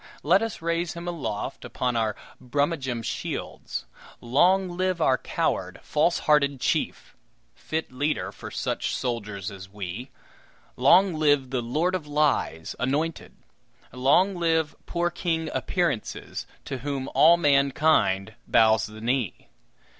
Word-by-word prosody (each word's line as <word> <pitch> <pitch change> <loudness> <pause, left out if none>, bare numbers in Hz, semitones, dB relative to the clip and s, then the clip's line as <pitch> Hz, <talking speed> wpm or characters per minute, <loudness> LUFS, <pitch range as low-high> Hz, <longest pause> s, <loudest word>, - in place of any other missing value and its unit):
Let 180 +7 +4
us 225 -7 -4
raise 170 0 -1
him 170 +1 -7
aloft 145 -12 -4
upon 125 -1 -2
our 110 -2 0 0.3
Brummagem 130 -2 -1
shields. - - -4 0.3
Long 180 +10 +3
live 185 -1 0
our 130 -5 +3
coward, - - -2
falsehearted 150 -3 +2
chief! - - -1 0.4
fit 160 - -4
leader 145 +4 -1
for - - -9
such - - -2
soldiers 105 -5 -3
as 95 -1 -10
we! 100 +5 -6 0.7
Long 180 +9 +5
live 145 -4 +2
the 130 -2 0
Lord 155 +10 0
of 175 -5 -3
Lies, 145 - 0
anointed! 150 +6 -1 0.6
Long 140 +10 +3
live 160 -4 +1
poor 175 0 0
King 165 -2 -2
Appearances, 170 - -2 0.2
to 135 - -4
whom 135 0 -3
all 170 +2 +7
mankind 140 - +3
bows 110 -3 +4
the 110 0 -11
knee! 120 -3 -2
145 Hz, 125 wpm, -26 LUFS, 120-165 Hz, 0.7 s, all